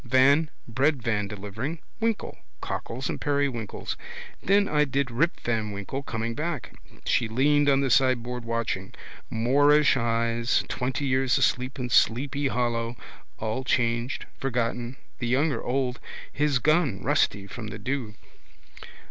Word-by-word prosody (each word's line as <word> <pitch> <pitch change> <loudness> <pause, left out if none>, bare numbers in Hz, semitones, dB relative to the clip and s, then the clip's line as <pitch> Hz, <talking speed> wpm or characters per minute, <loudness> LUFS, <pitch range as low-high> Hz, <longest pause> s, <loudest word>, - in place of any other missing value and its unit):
Van: 140 +5 +4 0.2
breadvan 115 -5 +1
delivering. 105 - -5 0.2
Winkle: 225 -1 -1 0.2
cockles 130 - -4
and - - -4
periwinkles. 140 -7 -1 0.5
Then 200 +1 +3
I 150 0 +3
did 140 -2 -1
Rip 155 +9 +1
van 110 -3 -1
Winkle 100 +7 -4
coming 115 -3 -3
back. 155 +1 -3 0.3
She 115 - +2
leaned 145 +5 +3
on 135 0 +4
the 135 -2 +1
sideboard 125 -2 +2
watching. 115 -5 -3 0.3
Moorish 145 +6 +4
eyes. 115 0 +1
Twenty 130 +3 -2
years 130 -1 +2
asleep 130 +2 +1
in 125 -2 -4
Sleepy 135 +6 +3
Hollow. 120 -2 -1 0.4
All 110 +4 -2
changed. 120 +3 0
Forgotten. 120 -1 -1 0.2
The 120 - -2
young 140 +6 +2
are - - -2
old. 125 0 -1 0.3
His 145 -1 +2
gun 140 - +2
rusty 100 +2 +2
from 110 +2 -7
the 105 - -6
dew. 125 -5 -3
125 Hz, 130 wpm, -26 LUFS, 115-140 Hz, 0.5 s, Van